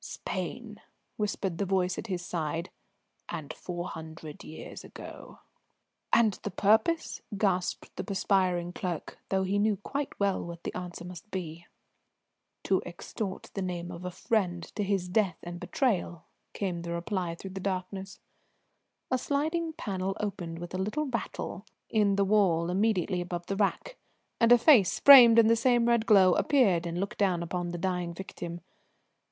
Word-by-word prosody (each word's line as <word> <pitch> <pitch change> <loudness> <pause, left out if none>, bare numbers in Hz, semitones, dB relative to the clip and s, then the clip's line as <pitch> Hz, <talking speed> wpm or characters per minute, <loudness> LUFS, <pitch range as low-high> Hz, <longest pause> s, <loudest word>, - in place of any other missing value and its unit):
"Spain!" - - -5 0.3
whispered 200 -4 -2
the 200 - +1
voice 185 -1 +1
at - - -6
his 180 -3 -3
side, 165 0 -3 0.6
"and 155 -5 -5
four 175 0 -5
hundred 160 -1 -9
years 155 - -9
ago." - - -11 0.7
"And 220 -4 +4
the - - -3
purpose?" 220 - +2 0.2
gasped 185 -3 -1
the - - -4
perspiring 185 -3 +1
clerk, 175 -3 -5
though 190 0 +1
he 195 +2 0
knew 210 -1 +2
quite 275 +8 -4
well 200 -1 +1
what 170 0 -8
the - - -4
answer 180 -1 -6
must 180 +2 -10
be. 170 -3 -6 1.0
"To 190 - +2
extort 190 +3 -6
the 195 - -3
name 175 -1 -4
of 175 0 -8
a 180 - -3
friend, 180 -2 -1
to - - -3
his 195 -2 0
death 185 -2 +1
and 175 0 -6
betrayal," 180 - -1 0.3
came 180 -4 -2
the 170 0 -4
reply 175 -1 -2
through 190 +3 -8
the 190 - -6
darkness. 190 0 -4 0.9
A 255 - +2
sliding 320 +5 -1
panel 195 - -3
opened 180 -5 -4
with 175 +1 -8
a 185 - -2
little 215 +11 -1
rattle 235 -6 -4 0.3
in 205 -3 +3
the 200 0 +2
wall 180 -5 +3
immediately 185 -2 +1
above 175 -1 -5
the 195 - -2
rack, 215 - -1 0.4
and 230 0 +4
a 245 - +10
face, 235 - +5
framed 245 -5 +10
in 230 - +8
the 230 +1 +5
same 240 0 +3
red 235 -1 +2
glow, 190 -4 +7
appeared 195 - +3
and 170 +1 -3
looked 200 +2 -4
down 185 -4 +2
upon 175 +1 -3
the 175 - -4
dying 180 -1 -2
victim. 175 -2 -7
190 Hz, 160 wpm, -29 LUFS, 175-210 Hz, 1.0 s, a